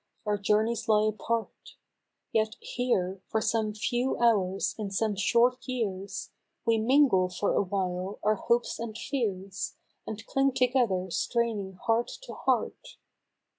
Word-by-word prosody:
" -, -, -43 dB
our 210 Hz, 0 st, +1 dB
journeys 215 Hz, +3 st, +1 dB
lie 215 Hz, 0 st, +5 dB
apart; 225 Hz, +1 st, -4 dB, 0.6 s
Yet 220 Hz, 0 st, +1 dB
here, 195 Hz, -7 st, -1 dB
for 220 Hz, -, 0 dB
some 215 Hz, -1 st, 0 dB
few 240 Hz, +4 st, 0 dB
hours 195 Hz, -5 st, +2 dB
in 210 Hz, -2 st, -2 dB
some 210 Hz, +2 st, 0 dB
short 240 Hz, +6 st, +2 dB
years 200 Hz, -6 st, -3 dB, 0.3 s
We 230 Hz, -1 st, +3 dB
mingle 225 Hz, -6 st, +4 dB
for 180 Hz, +3 st, 0 dB
awhile 190 Hz, 0 st, -1 dB
our 215 Hz, +1 st, +4 dB
hopes 235 Hz, +3 st, 0 dB
and 225 Hz, -2 st, -5 dB
fears. 195 Hz, -8 st, -3 dB, 0.3 s
And 220 Hz, +1 st, -6 dB
cling 270 Hz, 0 st, +2 dB
together 240 Hz, -8 st, +1 dB
straining 220 Hz, -2 st, -1 dB
heart 225 Hz, +5 st, 0 dB, 0.2 s
to -, -, -8 dB
heart. -, -, -1 dB
215 Hz, 135 wpm, -29 LUFS, 195-235 Hz, 0.6 s, lie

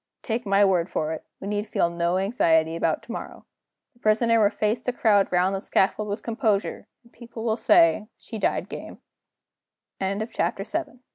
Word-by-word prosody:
Take 230 Hz, -1 st, -3 dB
my 200 Hz, +1 st, +4 dB
word 180 Hz, -3 st, +1 dB
for 155 Hz, 0 st, -2 dB
it, 160 Hz, -, -7 dB, 0.2 s
we 195 Hz, -, -7 dB
need 210 Hz, +1 st, -2 dB
feel 170 Hz, -4 st, 0 dB
no 170 Hz, +1 st, 0 dB
anxiety 165 Hz, -6 st, +2 dB
about 165 Hz, -1 st, 0 dB
to -, -, -9 dB
morrow. -, -, -7 dB, 0.5 s
The 240 Hz, -, -28 dB
Prisoner 230 Hz, +1 st, +3 dB
will 205 Hz, -, +5 dB
face 215 Hz, +2 st, -1 dB
the 250 Hz, -, -1 dB
crowd 210 Hz, -5 st, +2 dB
round 180 Hz, +2 st, +2 dB
the 195 Hz, -, -2 dB
scaffold 210 Hz, +3 st, +1 dB
with 205 Hz, +3 st, -4 dB
composure; 220 Hz, -3 st, -1 dB, 0.2 s
and 235 Hz, -, -24 dB
the -, -, -27 dB
people 230 Hz, -1 st, -9 dB
will 220 Hz, -2 st, +1 dB
say, 165 Hz, -2 st, +4 dB
'She 225 Hz, -, -8 dB
died -, -, -3 dB
205 Hz, 165 wpm, -25 LUFS, 180-225 Hz, 0.5 s, will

